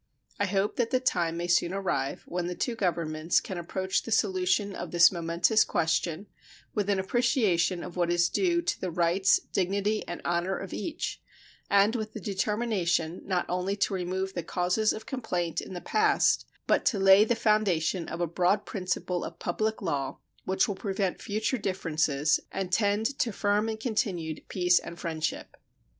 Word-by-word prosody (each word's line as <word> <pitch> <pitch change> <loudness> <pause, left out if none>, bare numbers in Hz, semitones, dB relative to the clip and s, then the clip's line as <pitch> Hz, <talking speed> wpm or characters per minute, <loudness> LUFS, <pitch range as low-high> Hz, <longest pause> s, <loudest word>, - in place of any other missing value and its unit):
I 205 - +1
hope 195 +2 0
that 235 -2 +1
the 255 - +2
time 170 -9 0
may 170 - -2
soon 175 0 +2
arrive 140 -9 -2
when 175 0 -3
the 180 - -4
two 240 - -1
Governments 170 -5 0
can 185 -2 -6
approach 190 +2 -1
the - - -9
solution 195 -1 +1
of - - -6
this 170 -1 +6
momentous 170 +5 +2
question 170 +2 -1 0.5
with 205 -1 -1
an 200 - +2
appreciation 190 - +1
of 175 - -8
what 175 -1 +1
is 175 0 +3
due 345 - +1
to 350 - -2
the 185 - -2
rights, 175 +3 +3
dignity, 200 +3 0
and 175 - -5
honor 175 +2 0
of 195 - -7
each, 330 0 -4 0.5
and 200 +3 +4
with 215 -2 -4
the - - -6
determination 190 -4 -1
not 185 -2 0
only 180 +2 -1
to 200 0 0
remove 190 +1 -2
the 175 - -2
causes 180 +6 +1
of 220 - -6
complaint 180 - -2
in 190 - -8
the 175 - -5
past, 430 -1 +2 0.2
but - - +2
to 215 - +2
lay 195 +1 +7
the 235 +2 +1
foundation 190 -6 +1
of 165 - -5
a - - +2
broad 180 +5 +1
principle 180 -2 -2
of - - -7
public 215 +5 -2
law 140 -6 -2 0.3
which 190 +5 +2
will 205 - -1
prevent 195 -1 -2
future 215 +4 -1
differences 160 -6 +1
and 190 -2 -3
tend 205 +2 +2
to 235 - +1
firm 205 +2 +1
and 220 0 -4
continued 195 -9 -2
peace 180 -1 +3
and 170 - -9
friendship. 160 -2 -3
190 Hz, 175 wpm, -28 LUFS, 175-210 Hz, 0.5 s, lay